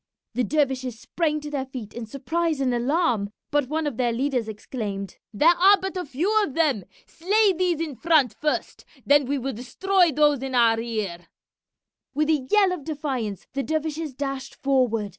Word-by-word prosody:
The 250 +2 0
dervishes 260 -3 -1
sprang 305 +1 -1
to 295 0 -7
their 270 -2 -3
feet 245 -6 -8
in 235 -2 -6
surprise 315 +6 -1
and 260 -2 +1
alarm, 240 - +1 0.2
but 290 -3 +1
one 315 +1 -1
of 285 -6 -3
their 245 -2 +1
leaders 250 -1 -1
exclaimed, 205 -2 -6
"There 305 +11 +5
are 390 +4 +6
but 385 0 -4
a 365 - -3
few 360 +11 +1
of 290 -10 -4
them! 285 - +1 0.2
Slay 405 +4 +2
these 355 -2 0
in 325 -3 -3
front 285 -3 +3
first, 300 +7 -2 0.2
then 285 0 +5
we 280 +3 -1
will 270 +1 -3
destroy 355 - +1
those 295 -2 +3
in 265 -1 -3
our 230 -2 +5
rear!" 210 -7 -4 0.9
With 305 +1 +1
a 280 -5 0
yell 405 -3 +4
of 355 -5 -4
defiance 270 - -4
the 275 - -1
dervishes 315 -1 -3
dashed 275 -1 -4
forward. 250 -6 +1
275 Hz, 180 wpm, -24 LUFS, 240-320 Hz, 0.9 s, are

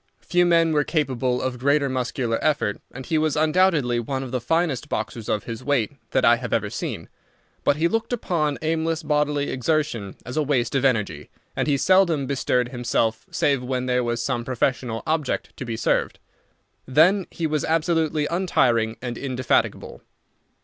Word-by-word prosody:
Few 175 0 +2
men 165 -1 +4
were 150 -1 +3
capable 130 -5 -1
of 130 -1 -3
greater 140 +2 +2
muscular 125 -2 -2
effort, 140 -9 0
and 130 +1 -8
he 160 -2 +1
was 155 -1 +1
undoubtedly 155 -6 +2
one 130 +3 -3
of 130 - -7
the 125 -2 -2
finest 160 0 0
boxers 110 0 -4
of 105 - 0
his 115 +1 -7
weight 130 -6 +1 0.2
that - - +2
I - - +6
have - - -6
ever - - 0
seen; - - -5 0.6
but - - +3
he 160 +3 +2
looked 225 +6 -2
upon 160 - -1
aimless 160 0 -1
bodily 150 -1 0
exertion 130 -7 -1
as 125 +4 -6
a - - +3
waste 130 -5 0
of 135 -1 +1
energy, 105 - 0 0.3
and - - -1
he 145 -2 +2
seldom 170 -4 +3
bestirred 125 -2 0
himself 115 -3 -1
save 140 -3 +1
when 125 0 -2
there 125 0 +1
was 120 -1 -1
some 120 0 -1
professional 125 -2 -1
object 155 -4 -2
to 130 - -5
be 115 -2 -4
served. - - 0 0.7
Then 175 +8 +4
he 165 - -4
was 155 -2 0
absolutely 160 -2 +1
untiring 120 -11 +1
and 120 -2 -4
indefatigable. 130 -2 -1
140 Hz, 170 wpm, -23 LUFS, 125-155 Hz, 0.7 s, I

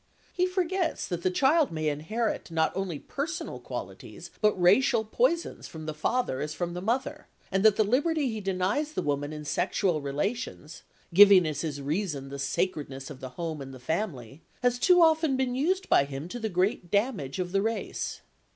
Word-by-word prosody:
He 365 0 +2
forgets 365 -1 -1
that 175 -2 -3
the 185 - +2
child 275 - +3
may 155 -1 -2
inherit 170 +13 -2
not 160 -1 0
only 190 -5 -2
personal 310 - -5
qualities - - -8
but 210 -3 +3
racial 220 +5 +4
poisons 340 - 0
from 160 -1 -9
the 155 - -3
father 155 - -1
as 150 +1 -4
from 175 +1 -3
the 180 - -5
mother, 260 +8 -2 0.2
and 195 +1 +1
that 215 -2 +6
the 215 - +3
liberty 285 +7 +1
he 220 -3 -3
denies 195 +11 -1
the - - -2
woman 145 0 -1
in 150 -1 -7
sexual 175 0 0
relations 155 - -4 0.3
(giving 195 -1 +8
as 155 -2 -2
his 145 -4 -4
reason 150 -3 -2
the 140 0 -7
sacredness 140 -2 -2
of 135 - -10
the 130 -2 -7
home 160 -3 -4
and 135 -1 -8
the - - -11
family) 140 - -4 0.2
has 245 0 +2
too 355 +3 +6
often 320 -4 +3
been 260 -2 0
used 365 +9 0
by 140 - +4
him 140 +3 -6
to 245 - -5
the 220 -1 -2
great 180 -1 0
damage 200 - 0
of 180 -1 -3
the 195 +1 +2
race. 225 +2 -3
190 Hz, 190 wpm, -28 LUFS, 150-250 Hz, 0.3 s, giving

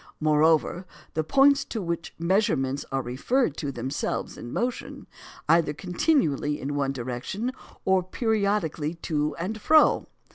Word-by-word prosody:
Moreover, 155 +3 +2 0.3
the 155 - 0
points 275 - +4
to 225 - -4
which 170 -4 -4
measurements 165 -7 +1
are 135 -1 -1
referred 155 - 0
are 140 - -2
themselves 130 +2 -3
in 120 - -8
motion, 245 +1 -3 0.4
either 165 -3 +3
continually 175 - +1
in 140 +2 -4
one 140 -1 0
direction, 130 - -4 0.3
or 190 -1 +4
periodically 200 - -1
to 150 -2 -2
and 200 +6 -4
fro. 310 +5 +4
165 Hz, 130 wpm, -26 LUFS, 145-210 Hz, 0.4 s, points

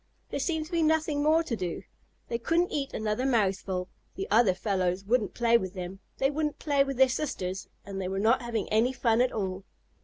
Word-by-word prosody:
There - - -2
seemed 320 -3 -1
to 320 - -14
be 340 -1 +1
nothing 310 -2 +2
more 315 +3 +4
to 260 -8 -2
do. 180 -5 -4 0.4
They 235 - -2
couldn't 335 +8 +1
eat 280 -2 -2
another 215 +3 -1
mouthful, 195 -7 0 0.3
the 390 +2 -4
other 220 -5 +5
fellows 185 -1 -1
wouldn't 220 -2 +1
play 235 -1 +4
with 190 -1 -6
them, 185 +1 -6 0.2
they 270 +1 +2
wouldn't 300 0 -1
play 285 -2 +2
with 275 -2 -4
their 265 0 +7
sisters, 195 -9 -3 0.2
and 195 -1 -5
they 185 - -2
were 190 +1 -3
not 225 +6 +3
having 230 -4 -2
any 225 +4 +2
fun 240 -2 +2
at 250 - +2
all. 190 -2 -3
235 Hz, 210 wpm, -28 LUFS, 195-285 Hz, 0.4 s, their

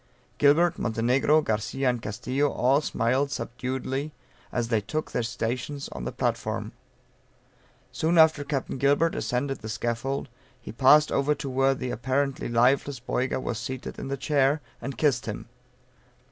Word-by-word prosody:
Gilbert, 160 +4 +4
Montenegro, 125 +7 +2
Garcia 115 +3 -1
and 125 -2 +1
Castillo 130 +8 -1
all 135 +4 +2
smiled 130 +1 0
subduedly 130 +3 -3 0.4
as 120 -2 -1
they 110 -3 +2
took 155 +9 -4
their - - 0
stations 125 +4 -3
on - - -7
the 65 - -2
platform. - - -2 1.2
Soon 165 +2 +1
after 160 -2 +6
Capt. 140 -2 -3
Gilbert 145 +4 +3
ascended 125 +5 -2
the 110 - -7
scaffold, 120 +6 -2 0.3
he - - -9
passed 135 +6 +5
over 145 +2 +2
to 140 0 -6
where 135 +1 +3
the 130 -1 -4
apparently 135 +3 -1
lifeless 130 +3 +2
Boyga 125 +1 -1
was 120 -3 -3
seated 130 -1 -6
in - - -5
the 140 0 -3
chair, 140 +1 +2 0.2
and 135 +2 -5
kissed 135 -7 +1
him. - - -5
135 Hz, 145 wpm, -26 LUFS, 120-145 Hz, 1.2 s, after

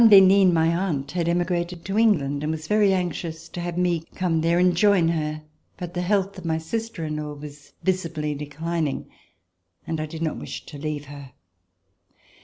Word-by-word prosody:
d'Henin, 195 -3 +8
my 165 0 +3
aunt, 160 -7 -1
had 170 -2 0
emigrated 175 0 -1
to 195 - -3
England 145 -11 +3
and 150 +1 -1
was 160 0 -4
very 210 0 +4
anxious 170 -3 -2
to 175 - -6
have 175 0 -4
me 175 -2 +2 0.2
come 170 -3 +1
there 165 +1 +2
and 180 0 +4
join 185 -3 +4
her, 155 -2 -2 0.3
but 175 -1 -6
the 175 - -1
health 195 +1 0
of - - -11
my 160 -1 0
sister 190 +1 -4
in 155 0 -3
law 150 -1 -4
was 145 0 -11
visibly 165 -5 -1
declining 150 +1 -3 0.8
and 160 -1 -2
I 155 - -3
did 160 +1 -5
not 160 - -1
wish - - -7
to 145 - -9
leave 150 -1 -3
her. 140 -2 -10
170 Hz, 185 wpm, -24 LUFS, 155-185 Hz, 0.8 s, d'Henin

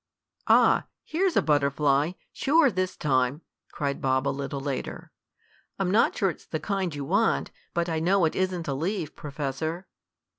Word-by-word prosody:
"Ah, - - +5 0.2
here's 365 +2 0
a - - +4
butterfly. 145 +1 +2 0.2
Sure, 290 -1 +3
this 185 -1 -2
time!" 130 0 +1 0.3
cried 140 -1 -3
Bob 130 +1 +1
a - - +3
little 140 0 -3
later. 135 -1 -5 0.7
"I'm 190 -2 0
not 215 - +3
sure 195 -3 +2
it's - - -15
the 155 - -3
kind 190 -5 -2
you 140 -1 -4
want, 70 - +1 0.2
but 170 0 +1
I 160 -2 -1
know 180 +2 +3
it 155 - -1
isn't 185 -3 -1
a 140 - 0
leaf, 165 +2 -3
Professor." 150 +4 -4
155 Hz, 160 wpm, -26 LUFS, 140-185 Hz, 0.7 s, Ah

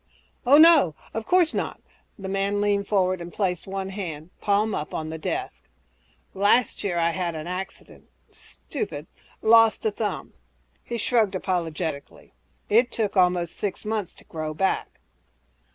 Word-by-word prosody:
"Oh, 280 +3 +8
no... 310 - +7 0.2
of 225 0 -4
course 355 -3 +4
not!" - - -3 0.4
The 195 -3 -7
man 195 +1 0
leaned 205 -1 +1
forward 185 -3 +1
and 170 0 -7
placed 180 -3 -2
one 195 0 -4
hand, 175 -5 -6
palm 205 +1 +2
up, 150 - -4
on 155 0 -3
the 160 0 -6
desk. - - -4 0.7
"Last 205 +5 +2
year 185 -4 -1
I 170 0 +2
had 170 -1 -2
an 155 -1 -5
accident... 185 +2 -7 0.2
stupid... 435 - -6 0.4
lost 225 - +5
a 440 - +2
thumb." - - -4 0.5
He 235 - -4
shrugged 220 -3 +1
apologetically, 165 -5 -3 0.3
"It 235 +3 +3
took 210 -3 -1
almost 180 -2 +2
six 205 0 -4
months 215 -4 -2
to - - -16
grow 155 -1 -5
back." 190 +4 -1
195 Hz, 150 wpm, -25 LUFS, 175-215 Hz, 0.7 s, Oh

